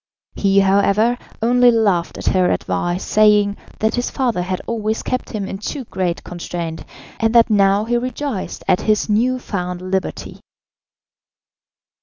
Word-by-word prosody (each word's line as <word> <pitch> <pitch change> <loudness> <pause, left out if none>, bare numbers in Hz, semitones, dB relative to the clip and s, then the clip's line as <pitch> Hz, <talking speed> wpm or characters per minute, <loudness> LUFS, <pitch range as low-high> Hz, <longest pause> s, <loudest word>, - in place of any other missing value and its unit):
He, 195 -1 +3
however, 200 +4 +3 0.3
only 245 +1 +5
laughed 205 -7 +1
at - - -7
her 185 -1 +3
advice, 175 +2 -1
saying, 210 -1 +4 0.2
that 220 0 0
his 245 0 -1
father 240 -8 -1
had 185 +1 -3
always 220 -1 -2
kept 255 - -3
him 205 -4 -4
in 195 - -6
too 265 +6 -5
great 185 -6 -3
constraint, 170 -2 -6 0.4
and 225 +1 +1
that 230 -1 +5
now 200 0 +3
he 240 +1 +1
rejoiced 255 -2 -4
at - - +3
his 215 0 +1
new 245 +5 +2
found 180 -7 -4
liberty. 185 +1 -4
210 Hz, 145 wpm, -19 LUFS, 185-230 Hz, 0.4 s, only